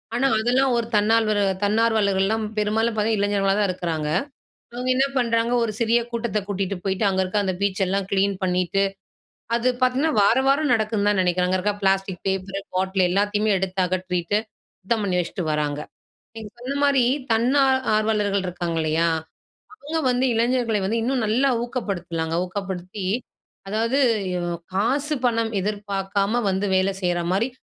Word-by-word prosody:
ஆனா, 265 +3 +2
அதெல்லாம் 250 +3 +2
ஒரு 230 -1 -1
தன்னால்வரு, 215 0 +3 0.2
தன்னார்வலர்கள்லாம் 215 -1 +2
பெரும்பாலும் 220 +2 +1
பாத்தா, 215 +1 +1
இளைஞர்களா 200 -1 +1
தான் 205 - +2
இருக்குறாங்க. 165 -4 -2 0.6
அவங்க 250 +1 -3
என்ன 265 +1 +3
பண்றாங்க, 230 -1 +1
ஒரு 225 - -1
சிறிய 235 0 +3
கூட்டத்தை 230 -3 -1
கூட்டிட்டு 200 -1 -2
போய்ட்டு, 190 +1 -1
அங்க 190 -1 +1
இருக்கிற 195 +3 0
அந்த 185 -1 -1
பீச் 200 0 0
எல்லாம் 195 0 -1
கிளீன் 200 0 +2
பண்ணிட்டு, 180 +1 +1 0.7
அது 235 +2 +2
பார்த்தீங்ன்னா, 260 +5 +2
வார 205 +5 +4
வாரம் 280 0 +3
நடக்குன்னு 215 -2 0
தான் 205 -2 +1
நினைக்கிறேன். 180 0 +1
அங்க 185 - +1
இருக்க 205 +2 0
பிளாஸ்டிக் 195 -1 0
பேப்பர், 195 +1 -2
பாட்டில், 190 0 +1
எல்லாத்தையுமே 205 +3 +1
எடுத்தகற்றீட்டு, 185 0 -1 0.4
சுத்தம் 215 +3 -1
பண்ணி 180 -2 +1
வச்சுட்டு 175 0 -3
வராங்க. 150 -1 -1 0.6
நீங்க 220 -2 -7
சொன்ன 260 +3 -4
மாரி, 275 -3 +4 0.3
தன் 230 +3 +2
ஆ - - +3 0.3
ஆர்வலர்கள் 210 -3 +1
இருக்காங்க 175 -2 -3
இல்லையா? 160 +2 +1 0.7
அவுங்க 320 -5 -4
வந்து, 250 +1 +1
இளைஞர்களை 235 -2 +1
வந்து, 225 +4 0
இன்னும் 250 -1 0
நல்லா 250 +6 +2
ஊக்கப்படுத்தலாங்க. 175 -9 -3
ஊக்கப்படுத்தி, 190 0 -5 0.6
அதாவது 225 +5 0 0.4
யு 180 - -2 0.3
காசு 275 +9 +1
பணம் 230 -2 +1
எதிர்பாக்காம 200 +2 -1
வந்து, 190 +2 0
வேல 190 +1 +1
செய்ற 175 -1 0
மாரி, 225 +7 +1
205 Hz, 150 wpm, -23 LUFS, 190-230 Hz, 0.7 s, வார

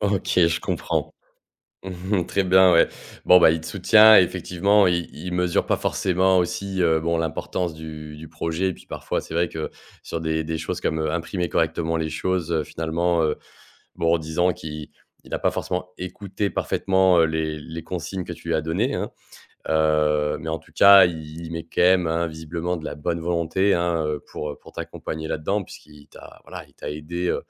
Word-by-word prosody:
OK, 100 -1 -1 0.2
je 85 - -1
comprends. - - -2 0.7
Mmh 95 +2 -4
mh, 85 - -3
très 100 - 0
bien 95 0 +6
ouais. 85 - +5 0.4
Bon, 90 0 +7
bah, 85 - +7
il 80 0 -1
te 80 - -10
soutient 105 +6 +6
et - - +7
effectivement, 95 +3 +2
il 85 -1 0
il 90 +4 -7
mesure 90 -1 +1
pas - - +1
forcément 95 0 +1
aussi, 95 +2 -2
heu, 80 -2 +3
bon, 85 +1 0
l'importance 80 +1 -2
du 75 -1 -9
du 80 +1 -10
projet 80 +3 -2
et 95 - -1
puis, - - -18
parfois, - - -3
c'est 80 - -10
vrai 85 0 +1
que, 80 -1 -5 0.4
sur 85 - -4
des 80 0 -1
des 80 0 -3
choses 90 +3 -4
comme, 80 -3 -1
heu, 80 -1 -1
imprimer 85 +1 -2
correctement 80 +1 0
les 80 -1 -2
choses, 85 +1 -2
heu, 80 -2 +1
finalement, 85 +1 -1
heu, 75 - 0 0.6
bon, 85 0 +1
en 85 - +2
disant 80 +3 0
qu'il 75 -1 -8 0.3
il - - -11
a - - -1
pas - - +2
forcément 90 0 -3
écouté 100 +2 -4
parfaitement, 95 -2 +2
heu, - - +5
les 80 -1 -2
les 80 +1 -8
consignes 90 +2 -5
que - - -6
tu - - -10
lui - - +1
as 80 - 0
données, 95 - -1
hein. - - -3 0.6
Heu, 75 -1 +2
mais, 80 - -7
en 80 - -2
tout - - -22
cas, 100 -1 +8
il 80 -2 -7
il - - -9
met 85 0 -5
quand 80 - -4
même, 90 -1 +4
hein, 85 +1 0
visiblement 80 +2 -4
de 80 - -9
la - - -4
bonne 85 +3 -3
volonté, 85 +3 +1
hein, 85 -2 0
heu, 75 -1 -2
pour, 75 - -6
heu, 75 - -8
pour - - -15
t'accompagner 80 0 -6
là-dedans 100 +8 -1
puisqu'il 75 -3 -15
t'a - - -14
voilà - - -8
il - - -27
t'a - - -7
aidé, 85 +4 -4
heu, - - +1
85 Hz, 210 wpm, -23 LUFS, 80-90 Hz, 0.7 s, cas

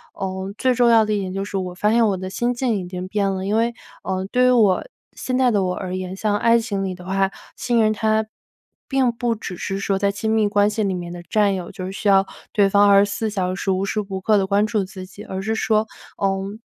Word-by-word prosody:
呃， 190 0 -4
最 255 -1 +2
重 245 -1 +3
要 225 -2 +5
的 215 - -1
一 205 - 0
点 185 -1 -4
就 195 0 -2
是 200 - -7
我 180 -1 -3
发 210 +3 +1
现 230 0 +4
我 195 -2 0
的 185 0 -5
心 240 +5 0
境 245 -2 0
已 185 - -4
经 180 0 -6
变 200 0 0
了。 190 0 -3
因 210 +2 0
为， 230 +1 +1 0.3
呃， 190 0 -2
对 250 0 +3
于 - - +5
我 215 -6 +4 0.3
现 255 0 -3
在 255 -2 +3
的 205 -3 +2
我 180 -1 -1
而 185 -1 -4
言， 185 0 -5
像 205 +1 0
爱 230 0 +4
情 200 -4 -3
里 190 -1 -2
的 180 0 -12
话， 195 0 +1 0.3
信 235 -2 +1
任 215 - +3
它 220 0 +1 0.6
并 265 -3 +2
不 235 0 -1
只 180 -4 -7
是 195 - -3
说 195 -1 0
在 200 0 +2
亲 220 +2 -2
密 215 -2 +3
关 205 0 +3
系 215 +1 -2
里 195 -2 0
面 175 -1 -5
的 175 - -8
战 205 +2 +2
友， 180 -2 -6
就 185 -2 -7
是 190 - -5
需 200 +2 -4
要 195 0 +5 0.3
对 200 -2 +4
方 205 +1 +5
24 200 +2 +3
小 185 -3 -2
时， 195 - -3
无 190 +1 0
时 215 - -2
无 190 0 -3
刻 215 +1 +3
地 195 - +2
关 205 +1 +2
注 215 -2 0
自 185 0 -9
己。 205 +3 -12
而 190 -3 -5
是 220 +3 -1
说， 220 -1 +1 0.4
嗯， 195 +2 -1
200 Hz, 275 characters per minute, -21 LUFS, 190-220 Hz, 0.6 s, 要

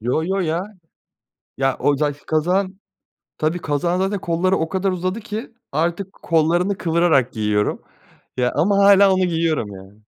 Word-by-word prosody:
Yo, 125 +7 0
yo, 190 +3 -1
ya. 165 -1 -1 1.0
Ya, 135 -1 +1
o 145 -1 +2
za 150 0 0
ki 145 - -19
kazağın 185 +5 0 0.6
Tabii 160 +3 -1
kazağın 165 +3 -1
zaten 195 +2 -1
kolları 175 +3 +1
o 160 - -2
kadar 190 +1 0
uzadı 185 +3 -2
ki 225 +2 -7 0.2
artık 170 +6 -2
kollarını 175 +4 +1
kıvırarak 165 -7 +2
giyiyorum. 105 -2 0 0.6
Ya 125 -1 +1
ama 200 +3 +2
hâlâ 200 -1 +6
onu 185 0 +2
giyiyorum 165 -8 0
yani. 95 +3 -14
170 Hz, 155 wpm, -20 LUFS, 145-190 Hz, 1.0 s, hâlâ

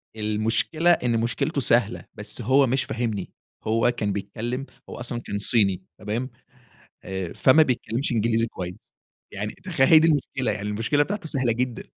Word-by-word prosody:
المشكلة 110 +10 +1
إن 120 -8 +2
مشكلته 115 +1 -1
سهلة، - - +2
بس - - -4
هو 135 +3 +4
مش 130 +2 +1
فاهمني. 110 -5 -3 0.4
هو 115 +2 +3
كان 105 -4 -2
بيتكلَّم 115 +7 -4 0.2
هو - - -7
أصلًا 120 0 -3
كان 100 -3 -4
صيني، 100 -4 +2 0.2
تمام؟ 115 +5 -3 0.8
آآ، 95 -2 -4
فمّا 145 +4 +5
بيتكلّمش 125 -1 -1
إنجليزي 115 0 +1
كويِس. 90 -2 -8 0.4
يعني - - -4
تخيَّل، 130 - 0
هي 160 - +9
دي 165 - +4
المشكلة 130 -4 0
يعني 105 0 -4
المشكلة 115 +8 +1
بتاعته 190 +1 -4
سهلة 130 -5 0
جدًا. 125 +1 -2
115 Hz, 155 wpm, -24 LUFS, 105-130 Hz, 0.8 s, هي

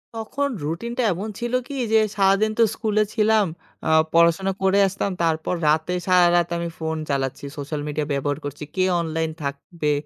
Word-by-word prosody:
তখন 280 +6 -2 0.2
রুটিনটা 235 - -2
এমন 205 +6 -5
ছিল 240 +1 -3
কি? 280 - -6 0.2
যে 220 - +7 0.2
সারাদিন 195 +2 +3
তো - - +7
স্কুলে 215 -1 +1
ছিলাম, 215 -1 +3 0.4
আ - - +2 0.2
পড়াশোনা 170 +3 +4
করে 190 +1 +3
আসতাম, 195 +1 -2
তারপর 160 +2 0
রাতে 160 +4 +2
সারারাত 175 -1 +4
আমি 170 0 -3
ফোন 160 0 -2
চালাচ্ছি। 135 0 -2
সোশ্যাল 145 +1 -4
মিডিয়া 150 0 -2
ব্যবহার 145 +1 -1
করছি। 145 +1 -6
কে 185 - +2 0.2
অনলাইন 160 0 -2
থাকবে 150 +2 -3
175 Hz, 160 wpm, -23 LUFS, 155-210 Hz, 0.4 s, যে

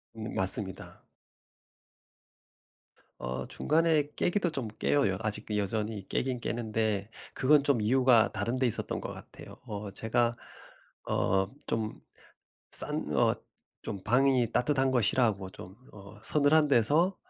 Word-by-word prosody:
음 110 0 -7
맞습니다. 95 0 +2 2.2
어 60 +1 -5
중간에 155 -2 +1
깨기도 180 -1 0
좀 135 -7 -3
깨요. 145 -1 +2
여 - - -1
아직 110 -1 -4
여전히 105 0 -3
깨긴 130 -1 -2
깨는데 110 -3 -2 0.2
그건 140 +2 +3
좀 140 -5 +1
이유가 125 0 +3
다른 120 +2 -2
데 130 - +1
있었던 115 - -2
것 - - -7
같아요. - - -13
어 105 -1 -6
제가 115 +3 0 0.7
어 95 0 0 0.2
좀 110 -1 -2 0.7
싼 - - +6
어 - - +3 0.5
좀 100 -2 -6
방이 125 0 +2
따뜻한 135 +1 +1
거 125 - +2
싫어하고 105 -4 +1
좀 95 +1 -12 0.2
어 100 +1 -14
서늘한 150 +3 +3
데서 150 - +2
115 Hz, 230 characters per minute, -29 LUFS, 105-135 Hz, 2.2 s, 싼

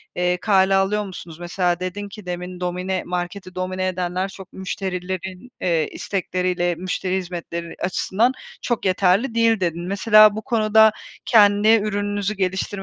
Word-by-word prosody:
eee, 180 0 +1
kale 195 -1 +3
alıyor 200 +2 +1
musunuz? 175 -4 -10
Mesela 175 0 -1
dedin 190 +3 -5
ki 205 -1 -11
demin, 180 0 -5
"Domine 180 +1 -2
marketi 180 +1 -5
domine 185 0 -2
edenler 185 +1 -2
çok 190 -1 -12
müşterilerin, 190 +2 -5
eee, 165 -4 +1
istekleriyle 180 -2 -1
müşteri 185 +1 -2
hizmetleri 170 -2 -6
açısından 200 +6 +1 0.3
çok 240 -4 -2
yeterli 195 +6 +2
değil." 230 -1 +3
dedin. 175 -1 -2
Mesela 215 +1 +6
bu 220 - -4
konuda 220 -2 +4 0.3
kendi 205 -2 +5
ürününüzü 205 -2 +1
geliştirmeyi 190 -1 -1
185 Hz, 135 wpm, -22 LUFS, 180-205 Hz, 0.3 s, Mesela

